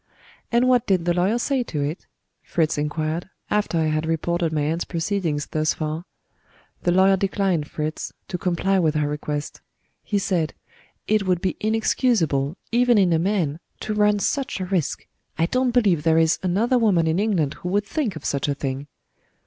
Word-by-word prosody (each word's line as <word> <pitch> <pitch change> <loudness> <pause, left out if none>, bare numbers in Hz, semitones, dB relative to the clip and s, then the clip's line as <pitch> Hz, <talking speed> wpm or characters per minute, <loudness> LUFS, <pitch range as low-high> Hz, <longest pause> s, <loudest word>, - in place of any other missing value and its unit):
"And 240 +1 +3
what 250 -2 +3
did 185 -4 +2
the 175 - +2
lawyer 185 +6 +2
say 265 +2 0
to 150 -11 -3
it?" 150 +5 -4 0.3
Fritz 160 -2 0
inquired, 155 +3 -2 0.2
after 210 -5 +1
I 160 - +2
had 155 +1 0
reported 165 +1 0
my 155 -1 0
aunt's 160 +4 0
proceedings 165 -4 -2
thus 155 0 +1
far. 155 +2 -3 0.8
"The 175 - +1
lawyer 190 +2 +5
declined, 190 -5 0
Fritz, 155 0 -4 0.2
to 180 - -3
comply 190 +2 +1
with 160 -3 +2
her 150 -1 +1
request. 150 0 -4 0.4
He 205 - -1
said, 175 -5 0 0.5
'It 215 -2 +2
would 180 -2 +2
be 185 0 -1
inexcusable, 210 - +1
even 240 0 +4
in 185 -4 +4
a 160 - +3
man, 170 -5 0 0.2
to 215 - -2
run 210 0 +3
such 270 +3 -1
a 185 - -2
risk 180 -6 -1 0.3
I 165 - +3
don't 255 +7 +1
believe 210 -10 +3
there 160 +1 +3
is 165 0 +3
another 220 +8 +2
woman 195 -8 +3
in 160 +3 +1
England 185 -9 +1
who 180 - -3
would 205 +2 +1
think 250 - -2
of 155 - -8
such 140 0 0
a 140 - 0
thing.' 135 0 -4
175 Hz, 180 wpm, -23 LUFS, 155-205 Hz, 0.8 s, lawyer